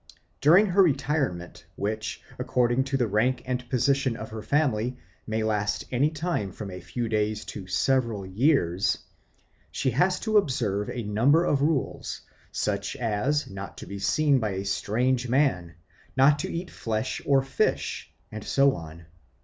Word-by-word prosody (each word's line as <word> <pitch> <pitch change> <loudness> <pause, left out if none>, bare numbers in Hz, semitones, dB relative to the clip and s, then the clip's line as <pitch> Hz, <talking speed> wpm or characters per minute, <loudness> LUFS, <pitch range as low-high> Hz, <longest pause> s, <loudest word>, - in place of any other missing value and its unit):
During 175 +9 +7
her 195 0 +3
retirement, 135 - 0
which, 105 +2 -3 0.2
according 125 +1 +1
to 135 0 -1
the 125 - +2
rank 120 +4 +1
and 125 -1 -3
position 135 -1 +1
of 110 - -7
her 110 -1 -6
family, 125 -3 0 0.3
may 110 0 -1
last 105 -1 -1
any 135 +4 +2
time 155 - -2
from 100 +1 -7
a 90 - -7
few 120 +5 -3
days 105 -1 -1
to 95 -3 -8
several 115 +2 +1
years, 95 - +2 0.7
she 130 - 0
has 180 +9 +2
to 220 -2 +2
observe 115 - -1
a 120 - -4
number 125 +11 +3
of 140 - +1
rules, 150 -2 -1 0.3
such 100 +1 -2
as 125 +4 0
not 95 -1 -8
to - - -8
be 100 +2 -7
seen 145 +6 +3
by 105 -4 -1
a 95 +1 -4
strange 125 +5 0
man, 115 - +1 0.4
not 145 +2 +5
to - - -3
eat 175 +2 -5
flesh 110 -1 -3
or 135 -1 +3
fish, 135 - -1 0.2
and 110 -1 -6
so 140 0 +3
on. 80 0 -10
120 Hz, 155 wpm, -26 LUFS, 105-140 Hz, 0.7 s, During